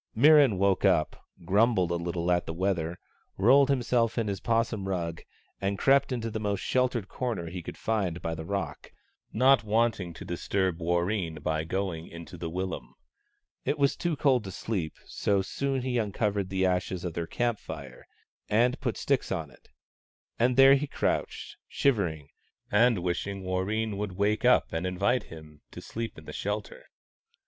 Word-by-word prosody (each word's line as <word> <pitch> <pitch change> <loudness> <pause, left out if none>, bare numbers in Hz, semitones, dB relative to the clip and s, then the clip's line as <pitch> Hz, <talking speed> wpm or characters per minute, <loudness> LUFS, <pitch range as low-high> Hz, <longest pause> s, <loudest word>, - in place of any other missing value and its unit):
Mirran 140 -4 +6
woke 100 0 +2
up, 90 -6 +1 0.2
grumbled 100 -1 +3
a - - +1
little 85 0 -1
at 90 0 +1
the 80 - -4
weather, 90 -2 -1 0.4
rolled 130 +7 +5
himself 120 -3 +1
in 115 -2 0
his 100 - -3
'possum 115 -3 0
rug 85 -3 -3 0.4
and 100 0 -1
crept 135 +3 +3
into 115 -3 -2
the 110 - -3
most 105 -2 -1
sheltered 125 -5 0
corner 110 -11 -3
he 90 0 -5
could - - -8
find 100 -6 -1
by 80 - -3
the 80 0 -6
rock, 100 +4 -4 0.4
not 130 +3 +4
liking 110 -4 +1
to - - -9
disturb 95 0 -1
Warreen 85 +1 0
by 80 0 0
going 85 -2 -3
into 85 +2 -10
the 85 -1 -5
willum. 95 +2 -5 0.7
It - - 0
was 140 -1 +2
too 170 -2 -1
cold 135 -5 +2
to 95 - -6
sleep, 90 -7 -3
so 100 - 0
he 95 - +1
soon 135 +5 -2
uncovered 105 -5 -1
the 95 -1 +1
ashes 90 0 -1
of 85 - -3
their 85 0 -3
camp 120 +1 -1
fire, 65 -4 -9 0.4
and 120 +5 +2
put 120 -4 -2
sticks 140 -2 0
on 80 -6 -3
it; - - -22 0.7
and 125 +2 +2
there 135 0 +9
he 140 +2 +1
crouched, - - -2
shivering, 90 - 0 0.4
and 110 -3 +4
wishing 95 +2 -2
Warreen 100 +3 -1
would 105 -2 -3
wake 105 +5 0
up 125 -8 +4
and 80 +3 -1
invite 105 +6 +1
him 80 -2 -13
to - - -10
sleep 115 0 -6
in - - -12
the - - -8
shelter. - - -4
100 Hz, 170 wpm, -28 LUFS, 90-120 Hz, 0.7 s, there